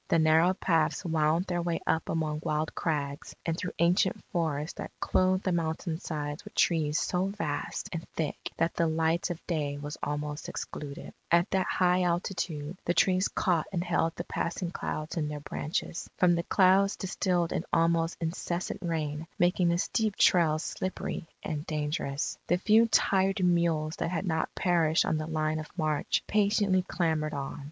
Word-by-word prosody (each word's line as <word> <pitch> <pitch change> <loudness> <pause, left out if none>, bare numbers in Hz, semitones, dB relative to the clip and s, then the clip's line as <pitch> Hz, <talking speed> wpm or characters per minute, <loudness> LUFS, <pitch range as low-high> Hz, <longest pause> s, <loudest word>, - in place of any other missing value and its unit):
The - - +3
narrow 160 +3 +4
paths 165 -1 +1
wound 160 +1 +2
their 175 -2 -1
way 170 -1 -1
up 160 - 0
among 155 -2 -1
wild 155 0 -1
crags, 145 -3 -3
and 165 - 0
through 180 - -4
ancient 180 +3 +3
forests 155 -2 -1
that - - -5
clothed 185 +1 +2
the 185 - +1
mountain 165 0 -1
sides 150 -1 -4
with 210 - -12
trees 155 -3 +2
so 180 +1 0
vast 195 -8 -3
and 165 0 -5
thick 155 -3 -3
that 165 0 +1
the 170 - +1
light 160 +1 +1
of 175 -2 -6
day 145 -4 -1
was 145 +1 -6
almost 150 +1 -3
excluded. 145 -1 -6 0.2
At 170 +3 +3
that 190 -1 +1
high 180 0 +3
altitude, 175 -2 -2
the 175 - 0
trees 185 +2 +3
caught 170 -4 0
and 175 -3 -1
held 165 -2 0
the - - -4
passing 170 0 -3
clouds 155 -2 -4
in 155 -2 0
their 150 0 -4
branches. 155 +3 -4
From 180 -1 +5
the 170 - +1
clouds 195 +1 +4
distilled 180 -3 0
an - - -1
almost 165 0 +2
incessant 170 +1 -3
rain, 160 -2 -2
making 175 0 +3
the 170 - +2
steep 215 +2 0
trails 160 -3 +4
slippery 185 -3 -4 0.2
and 155 -7 -3
dangerous. 150 -2 -2
The 175 - +3
few 220 +5 +5
tired 195 -3 +2
mules 170 -3 +1
that - - -1
had 180 +2 -2
not 160 -3 -1
perished 170 -3 +3
on 155 - 0
the 155 - -4
line 155 -1 0
of 155 - -7
march, 155 -3 0
patiently 205 -2 +2
clambered 160 -4 -1
on. 140 +1 -4
165 Hz, 170 wpm, -29 LUFS, 155-180 Hz, 0.2 s, From